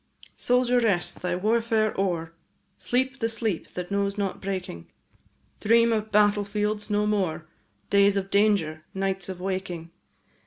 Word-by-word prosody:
Soldier, 250 0 +2
rest! 200 -7 0
thy 180 -1 -1
warfare 220 +2 +1
o'er, 170 -4 -1 0.5
Sleep 260 +2 -1
the 225 - 0
sleep 220 -5 -2
that 180 +1 -5
knows 200 0 0
not 200 -2 -2
breaking; 185 - -5 0.7
Dream 230 +2 +4
of 215 0 -2
battle 205 0 +4
fields 210 +1 -2
no 210 0 +1
more, 180 -7 -1 0.4
Days 200 0 +5
of 195 0 -3
danger, 200 -7 +2
nights 195 -1 -2
of 185 -1 -6
waking. 185 -3 -4
200 Hz, 140 wpm, -26 LUFS, 185-215 Hz, 0.7 s, Days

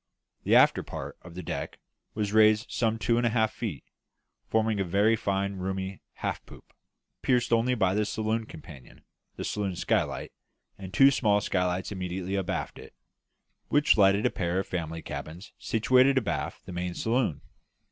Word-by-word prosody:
The - - +4
after - - +5
part - - -7
of 85 -1 -13
the 90 - -6
deck - - -5 0.4
was 105 -1 -2
raised 110 +1 +4
some 115 -1 0
two 115 +1 +1
and 120 - 0
a - - +2
half 110 -1 +1
feet, 90 - -5 0.6
forming 110 -1 +1
a 100 +4 +3
fine 100 -2 -2
roomy 95 +1 -4
half - - -4
poop, - - -15 0.5
pierced 120 -2 +1
only 120 +2 +2
by 95 -5 +2
the 105 +1 +1
saloon 110 +1 -2
companion, 70 -5 -13 0.3
the - - -5
saloon 100 -3 -2
skylight, - - -1 0.4
and 95 -1 -9
two 135 +6 +6
small 105 -6 +2
skylights 90 -2 -1
immediately 95 -1 -4
abaft 95 -3 -3
it, - - -13 0.7
which 145 +2 +4
lighted 100 0 +4
a - - +3
pair 90 0 -2
of 95 - 0
family 80 -2 -4
cabins 85 +6 -8
situated 130 +5 +3
abaft 115 -6 -2
the 90 - -8
main 90 0 -3
saloon. 115 - 0
100 Hz, 160 wpm, -28 LUFS, 90-110 Hz, 0.7 s, two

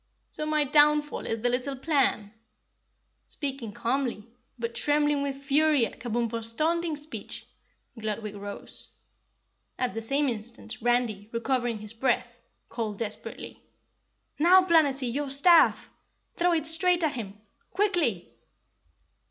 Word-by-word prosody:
"So 305 - -4
my 305 -1 +2
downfall 295 +1 +3
is 225 -1 -2
the 245 - +2
little 255 +3 -1
plan?" 265 -7 0 0.9
Speaking 270 -7 -4
calmly, 240 -1 -2 0.3
but 230 -1 -4
trembling 295 +3 +1
with 280 -1 -3
fury 280 -1 +3
at - - -9
Kabumpo's 230 -1 -2
taunting 330 +3 0
speech, 295 +1 -8 0.5
Gludwig 215 -1 -4
rose. 205 0 -9 0.8
At 250 -1 -1
the 225 - -4
same 275 +6 +1
instant 230 -1 -6
Randy, 235 -4 0
recovering 240 0 -1
his 215 +1 -9
breath, 245 +2 0 0.3
called 215 -4 -4
desperately. 225 -2 -6 0.8
"Now, 365 +4 +6
Planetty, 280 -8 +2
your 285 +1 -2
staff! 325 +5 +5 0.4
Throw 350 0 +2
it 320 -2 0
straight 350 +2 +3
at 310 - +1
him. 205 -5 -6
Oh, 215 - -34 0.2
quickly!" 340 - 0
265 Hz, 125 wpm, -27 LUFS, 230-300 Hz, 0.9 s, Now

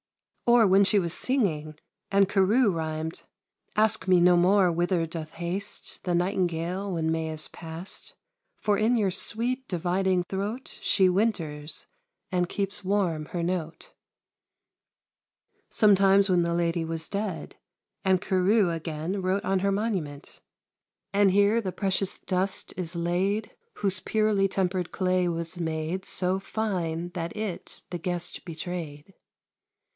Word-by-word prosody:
Or 235 -2 +6
when 195 +1 +6
she 205 +1 +3
was 170 -3 -1
singing, 160 - 0 0.4
and 200 0 +4
Carew 205 +4 +3
rhymed 160 0 -4 0.5
Ask 220 0 +2
me 185 -1 +5
no 180 +1 +6
more 185 +2 +4
whither 175 0 +1
doth 160 -1 -7
haste 180 +5 -4
The 180 -2 0
nightingale 180 +1 -1
when 160 -2 0
May 160 0 -1
is 155 -1 -5
past; 165 +3 -9 0.4
For 205 -1 +1
in 225 +4 +3
your 200 -4 +2
sweet 245 +7 -1
dividing 180 +1 +1
throat 200 +7 -5
She 190 -2 +3
winters, 170 -7 -1 0.5
and 180 -1 +1
keeps 195 0 -2
warm 185 -6 0
her 175 -1 -3
note. 170 -2 -4 1.8
Sometimes 195 -1 +5
when 180 -2 +4
the 170 0 0
lady 170 0 0
was 160 0 -4
dead, 200 -3 -4 0.5
and 190 -2 +3
Carew, 190 +1 +2
again, 165 +3 -3
wrote 185 +2 0
on 190 0 +2
her 200 +1 +1
monument 190 -9 -3 0.7
And 200 0 +5
here 205 +4 +4
the 190 -4 -3
precious 195 0 -1
dust 190 +1 -1
is 175 -1 -4
laid, 185 +5 0 0.2
Whose 195 -2 -1
purely 215 -2 +2
tempered 185 -2 -1
clay 185 -1 +1
was 170 +1 -2
made 160 +3 -2
So 185 +1 0
fine 175 -6 -2
that 170 +1 -5
it 210 -5 -5
the 175 - -3
guest 175 +1 -3
betrayed. 165 -1 -6
185 Hz, 135 wpm, -27 LUFS, 170-200 Hz, 1.8 s, Or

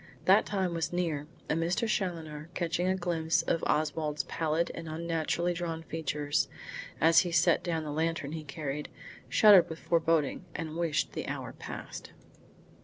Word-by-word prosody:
That 195 +3 +5
time 190 -4 0
was 165 -1 -1
near, 165 -5 -1 0.2
and 165 - 0
Mr. 175 +7 0
Challoner, 165 -7 -3
catching 175 +1 0
a 185 - +2
glimpse 170 -3 0
of 165 - 0
Oswald's 150 -1 0
pallid 160 +3 -1
and 165 - -7
unnaturally 170 +2 -1
drawn 165 -2 -4
features, 150 -2 -1 0.5
as 165 +1 +6
he 175 - 0
set 170 - +4
down 165 -3 -1
the 150 - -4
lantern 160 -1 -1
he 160 -1 -5
carried, 150 0 -4 0.4
shuddered 205 -5 +7
with 160 - -5
foreboding 165 -2 +1
and 160 -2 -4
wished 165 -3 0
the - - -4
hour - - -4
passed. - - -8
165 Hz, 155 wpm, -30 LUFS, 155-175 Hz, 0.5 s, shuddered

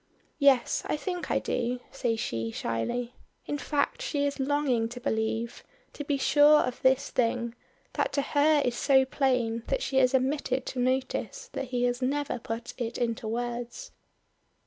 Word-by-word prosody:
"Yes, 275 -4 +4
I - - 0
think 360 +2 -4
I - - +2
do," 245 +1 -1
says 240 -4 -1
she 115 - -2
shyly. 115 - -2 0.3
In 290 - -3
fact 290 +11 -1
she 290 -13 0
is 280 0 -2
longing 265 -4 +1
to 245 +1 -7
believe, 225 -1 -2 0.3
to 290 - -5
be 285 -1 0
sure 295 +2 +6
of 250 0 -3
this 265 +1 +3
thing, 235 -1 0 0.4
that - - 0
to 280 - +1
her 295 +1 +3
is 245 -1 0
so 265 +1 +4
plain 250 -4 0
that - - 0
she 270 - -1
has 260 0 +4
omitted 265 -1 0
to 255 - -4
notice 265 - -1
that - - -3
he 250 -1 -2
has 245 +1 0
never 285 +1 -1
put 230 +1 -5
it 235 -1 -3
into 230 -1 -2
words. 240 - -4
255 Hz, 170 wpm, -28 LUFS, 235-285 Hz, 0.4 s, sure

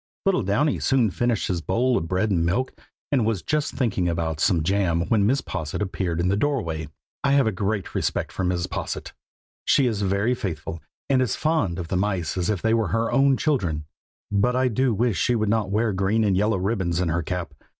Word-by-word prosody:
Little 195 -7 +3
Downy 115 +10 +1
soon 125 -6 +2
finished 120 +1 0
his 90 -3 -1
bowl 125 +8 +1
of 85 - -1
bread 95 +5 0
and 85 -4 +2
milk, 120 +10 0 0.4
and 135 -5 +3
was 110 -4 -1
just 150 -1 -1
thinking 100 -9 0
about 80 -2 -2
some 85 -1 +2
jam 90 -2 +1
when 105 -3 +3
Mrs. 135 +5 +1
Posset 75 -1 -4
appeared 95 -4 -2
in 85 - +1
the 95 - +2
doorway. 100 - -1 0.4
I 140 - +3
have 140 -2 +4
a 110 - +2
great 100 +1 -2
respect - - -1
for 95 - -3
Mrs. 90 -1 0
Posset. - - -5 0.5
She 140 - +3
is 110 -4 0
very 100 +5 +1
faithful, 85 -7 -5 0.3
and 130 -2 +3
as 125 -6 0
fond 155 - 0
of 85 -3 -5
the 95 - 0
mice 95 -4 -1
as 90 0 -1
if 105 -4 -1
they 110 0 +3
were 115 -3 +2
her 115 +6 0
own 135 +1 +4
children; 85 - 0 0.5
but 105 +5 +2
I 130 0 +2
do 130 +3 +1
wish 110 -4 +1
she 125 - +2
would 110 -2 0
not 105 -3 +1
wear 110 +1 +1
green 100 +4 +1
and 100 -3 +2
yellow 105 +2 +2
ribbons 95 -3 -1
in 90 -2 0
her 85 +2 0
cap. 85 -2 -4
100 Hz, 215 wpm, -24 LUFS, 90-120 Hz, 0.5 s, have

